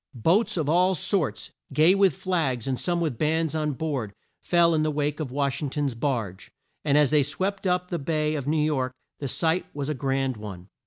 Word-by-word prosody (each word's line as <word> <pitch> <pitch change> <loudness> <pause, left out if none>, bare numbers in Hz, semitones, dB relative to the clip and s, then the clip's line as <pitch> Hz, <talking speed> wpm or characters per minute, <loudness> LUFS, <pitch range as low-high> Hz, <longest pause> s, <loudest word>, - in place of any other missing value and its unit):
Boats 175 - +2
of 155 -4 0
all 180 +4 +3
sorts, 175 -2 -1 0.2
gay 160 +4 +5
with 195 -6 +3
flags, 145 -11 -1
and 130 -2 -1
some 175 -1 0
with 150 -9 -2
bands 160 0 +1
on 155 -2 -1
board, 130 -9 -3 0.3
fell 170 -1 +3
in 155 - +2
the 155 - +1
wake 150 0 -1
of 150 -4 -3
Wash 140 +1 -1
ing 145 - -2
ton's 140 -1 -1
barge, 115 -7 -3 0.3
and 145 -1 +3
as 150 -2 +4
they 150 -1 +5
swept 190 +8 -2
up 180 0 0
the 170 - -1
bay 155 +1 0
of 140 -3 -3
New 150 0 +2
York 130 -4 -1 0.2
the 140 - -3
sight 165 +6 0
was 145 0 -3
a - - 0
grand 135 -2 -1
one. 100 -3 -9
150 Hz, 210 wpm, -26 LUFS, 135-165 Hz, 0.3 s, gay